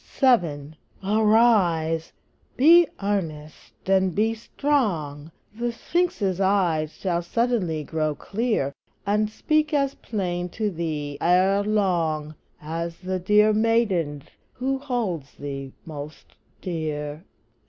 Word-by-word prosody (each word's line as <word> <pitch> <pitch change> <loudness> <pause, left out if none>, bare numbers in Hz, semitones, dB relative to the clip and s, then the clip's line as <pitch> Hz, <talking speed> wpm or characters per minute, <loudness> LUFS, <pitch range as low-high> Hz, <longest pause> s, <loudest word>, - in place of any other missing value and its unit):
VII. 165 - +2 0.3
Arise! 200 -7 +3 0.5
be 335 +5 +7 0.2
earnest 160 -8 -4
and 190 -2 +2
be 220 +2 +2
strong! 200 - -1 0.2
The 240 +2 -2
Sphinx's 230 - -1
eyes 175 -6 +1
shall 175 -3 -1
suddenly 180 -5 0
grow 155 -1 -1
clear, 205 - -1 0.3
And 210 +1 +1
speak 305 +6 0
as 275 -1 +1
plain 180 -4 -3
to 215 -2 0
thee 155 -4 -4
ere 185 +3 +4
long, 170 -8 0 0.3
As 165 +2 -4
the 185 0 -3
dear 210 +3 +4
maiden's 205 - +1 0.3
who 270 +1 -2
holds 220 - -3
thee 135 -2 -6
most 150 -1 -9 0.3
dear. 155 -3 -4
185 Hz, 105 wpm, -24 LUFS, 155-220 Hz, 0.5 s, be